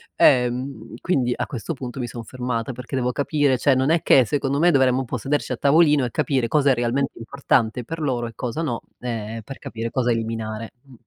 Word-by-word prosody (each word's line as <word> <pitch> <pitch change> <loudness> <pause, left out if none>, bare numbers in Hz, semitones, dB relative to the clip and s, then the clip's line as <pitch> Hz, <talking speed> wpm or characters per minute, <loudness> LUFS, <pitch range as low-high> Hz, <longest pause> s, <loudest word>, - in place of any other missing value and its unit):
Ehm, 125 -1 +2
quindi 130 -9 +1
a - - -2
questo 130 +4 -4
punto 130 -2 -7
mi 120 - -2
son 120 0 -7
fermata 125 0 -3
perché 125 +2 -7
devo 125 -1 0
capire. 145 0 +1
Cioè 140 +2 +3
non 130 +2 +1
è 165 0 +3
che 130 - +6
secondo 140 +1 -1
me 175 +3 +5
dovremmo 130 -3 +3
un 135 - -2
po' 125 - -3
sederci 140 +4 -2
a - - -4
tavolino 145 -1 +4
e 120 - -4
capire 130 -4 0
cosa 145 +2 +3
è - - +5
realmente 125 +3 -1
importante 120 -1 0
per 165 +5 -6
loro 125 -5 -1
e 115 - -9
cosa 125 +5 -3
no, 130 -8 -2 0.2
ehm, 115 -2 -4
per 135 +5 -9
capire 115 0 -5
cosa 125 -2 +1
eliminare. 115 -1 -3
Mh. 135 -2 -18
125 Hz, 215 wpm, -23 LUFS, 115-140 Hz, 0.2 s, che